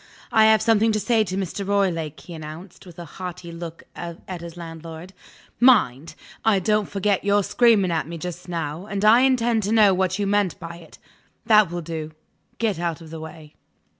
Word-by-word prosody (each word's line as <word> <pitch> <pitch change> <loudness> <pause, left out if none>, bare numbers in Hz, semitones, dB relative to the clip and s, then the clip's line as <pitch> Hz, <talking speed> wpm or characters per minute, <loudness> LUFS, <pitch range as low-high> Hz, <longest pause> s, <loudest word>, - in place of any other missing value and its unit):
"I 220 0 +5
have 220 -1 +5
something 225 0 +3
to 215 - 0
say 225 0 +2
to 185 -1 -4
Mr. 195 +1 -3
Roylake," 170 -7 -1
he 175 - -11
announced, 160 +4 -10
with 175 - -13
a 175 - -7
haughty 180 +1 -8
look 170 0 -8
at 175 +1 -7
his 170 0 -9
landlord. 165 +1 -9 0.5
"Mind! 175 - +3 0.3
I 220 -3 +4
don't 210 +2 +1
forget 200 -1 0
your 205 0 +2
screaming 215 -5 +3
at 160 -2 -1
me 170 0 -6
just 180 +2 -7
now, 165 +2 -4
and 200 0 -2
I 220 +3 +7
intend 240 -3 +2
to 205 +1 -2
know 215 -3 +5
what 185 0 0
you 205 - -1
meant 200 -3 0
by 170 -1 -8
it. 170 -2 -15 0.5
That 215 -5 +5
will 175 0 -4
do. 160 -1 -6 0.4
Get 215 -7 -1
out 170 -2 -2
of 160 -2 -12
the 165 - -7
way." 155 -1 -11
180 Hz, 195 wpm, -23 LUFS, 165-210 Hz, 0.5 s, I